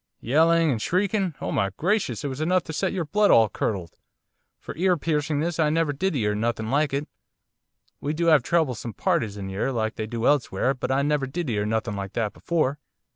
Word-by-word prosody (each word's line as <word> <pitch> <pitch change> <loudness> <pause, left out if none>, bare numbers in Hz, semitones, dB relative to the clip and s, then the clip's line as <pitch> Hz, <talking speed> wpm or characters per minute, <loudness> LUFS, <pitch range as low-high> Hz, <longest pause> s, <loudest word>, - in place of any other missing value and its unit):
'Yelling 165 +5 +3
and 115 -4 -2
shrieking 190 - 0
oh - - -3
my 100 - +1
gracious, 185 - 0
it - - -1
was 135 +2 -5
enough 180 +2 +2
to 160 - -7
set 190 +4 0
your 180 -4 -2
blood 205 +6 +2
all 110 -1 +6
curdled, 95 -4 -3 0.6
for - - -8
ear 180 +1 +2
piercingness 155 +1 -1
I 155 -2 +3
never 160 -1 +1
did 190 +4 -1
'ear 105 -5 +1
nothing 110 +1 -2
like 145 +1 +2
it. 140 +2 -2 0.9
We 150 +2 -2
do 170 +1 +2
'ave 150 -4 +6
troublesome 125 -6 -1
parties 135 - 0
in 100 -1 -5
'ere, 100 +8 -1
like 110 -3 -2
they 110 - -3
do 115 +1 -3
elsewhere, 135 -3 +2
but 130 - -4
I 135 +1 +2
never 145 -2 0
did 155 0 -3
'ear 105 -1 -1
nothing 110 -2 -1
like 100 -1 -5
that 110 -3 -1
before. 150 -4 -1
145 Hz, 205 wpm, -25 LUFS, 110-165 Hz, 0.9 s, all